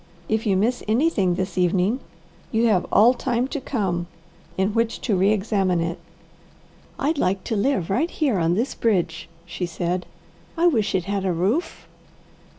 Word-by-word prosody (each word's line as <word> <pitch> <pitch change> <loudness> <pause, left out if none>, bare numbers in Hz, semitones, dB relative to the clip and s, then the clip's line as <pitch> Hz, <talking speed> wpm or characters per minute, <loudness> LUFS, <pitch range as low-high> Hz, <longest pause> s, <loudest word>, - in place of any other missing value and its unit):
If 220 0 -1
you 195 -2 +3
miss 235 +6 +1
anything 215 - +2
this 185 0 -3
evening, 185 +7 +2 0.5
you 225 +1 +2
have 185 -4 +2
all 235 +4 +6
time 250 0 -1
to 290 - -4
come 190 -10 -2 0.5
in 190 +2 +1
which 230 0 0
to 210 - 0
re 190 +2 +3
examine 195 -4 +1
it." 170 +1 -2 1.0
"I'd 295 +2 0
like 185 +1 0
to 225 - -2
live 200 -5 0
right 305 - +1
here 275 - 0
on 165 +1 +2
this 240 +7 -1
bridge," 175 -9 -1 0.2
she 175 +1 -4
said. 175 +2 -3 0.5
"I 335 - +2
wish 230 - +2
it 185 - +1
had 200 -1 -2
a 190 - +1
roof." 195 - -1
200 Hz, 165 wpm, -23 LUFS, 180-235 Hz, 1.0 s, all